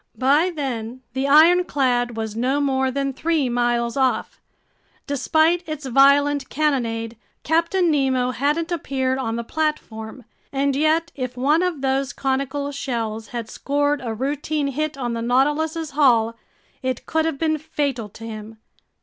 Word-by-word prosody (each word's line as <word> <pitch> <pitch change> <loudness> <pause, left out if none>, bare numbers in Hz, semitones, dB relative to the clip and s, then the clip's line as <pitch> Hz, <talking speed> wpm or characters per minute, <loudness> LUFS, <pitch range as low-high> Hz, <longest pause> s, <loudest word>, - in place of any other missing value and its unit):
By 285 +7 +3
then 255 -6 -4
the 265 +1 -1
ironclad 280 -7 +4
was 220 -1 -4
no 255 +5 +1
more 265 -2 +1
than 275 +1 -2
three 310 -1 0
miles 240 -1 0
off. 265 -2 0 0.6
Despite 315 +5 +2
its 305 -2 -5
violent 280 +2 +4
cannonade, 235 -6 -1 0.3
Captain 335 +2 +2
Nemo 260 -3 +1
hadn't 300 +7 -1
appeared 265 -5 -1
on 225 -3 -2
the 235 - -3
platform. 250 -5 -3 0.3
And 275 0 0
yet 315 +3 +2
if 255 -2 -5
one 295 +6 +3
of 360 -6 -1
those 270 0 0
conical 275 +1 -2
shells 225 -6 -3
had 235 -1 -5
scored 290 +3 -1
a 235 - -3
routine 285 +3 -1
hit 305 +1 -2
on 245 -3 -2
the 230 - -3
Nautilus's 295 +6 +1
hull, 235 -6 +3 0.5
it 260 -2 -3
could 320 0 0
have 325 -3 -1
been 315 0 0
fatal 275 -7 -2
to 225 - -13
him. 220 0 -8
275 Hz, 145 wpm, -22 LUFS, 245-300 Hz, 0.6 s, ironclad